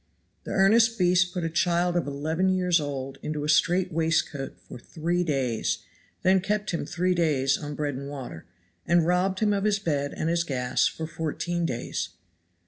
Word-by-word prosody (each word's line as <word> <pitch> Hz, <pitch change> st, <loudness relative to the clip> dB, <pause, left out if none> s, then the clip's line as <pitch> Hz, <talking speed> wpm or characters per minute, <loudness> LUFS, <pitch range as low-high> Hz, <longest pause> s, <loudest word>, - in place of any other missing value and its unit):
The -, -, -5 dB
earnest 225 Hz, +4 st, +4 dB
beast 180 Hz, -1 st, +3 dB
put 180 Hz, -1 st, -3 dB
a 165 Hz, -, 0 dB
child 175 Hz, +1 st, +1 dB
of 175 Hz, -4 st, 0 dB
eleven 160 Hz, +6 st, 0 dB
years 180 Hz, -2 st, +2 dB
old 135 Hz, -2 st, -5 dB
into 150 Hz, -1 st, -3 dB
a -, -, -2 dB
strait 175 Hz, +5 st, +3 dB
waistcoat 160 Hz, -4 st, -1 dB
for -, -, -9 dB
three 170 Hz, +6 st, -2 dB
days, 135 Hz, -8 st, -1 dB, 0.4 s
then 185 Hz, 0 st, +4 dB
kept 210 Hz, +2 st, -1 dB
him 170 Hz, -4 st, -3 dB
three 180 Hz, +2 st, 0 dB
days 150 Hz, -6 st, +2 dB
on 145 Hz, -1 st, -6 dB
bread 145 Hz, -1 st, -2 dB
and 140 Hz, +2 st, -6 dB
water, 130 Hz, -, -8 dB, 0.4 s
and 170 Hz, -1 st, +4 dB
robbed 185 Hz, +3 st, +1 dB
him 210 Hz, -1 st, +3 dB
of 200 Hz, -1 st, 0 dB
his 210 Hz, -1 st, +2 dB
bed 145 Hz, -7 st, -2 dB
and 155 Hz, -, -1 dB
his 170 Hz, 0 st, +1 dB
gas 130 Hz, -5 st, +1 dB
for 160 Hz, -, -4 dB
fourteen 165 Hz, +2 st, -2 dB
days. 120 Hz, -4 st, -3 dB
165 Hz, 180 wpm, -26 LUFS, 145-180 Hz, 0.4 s, earnest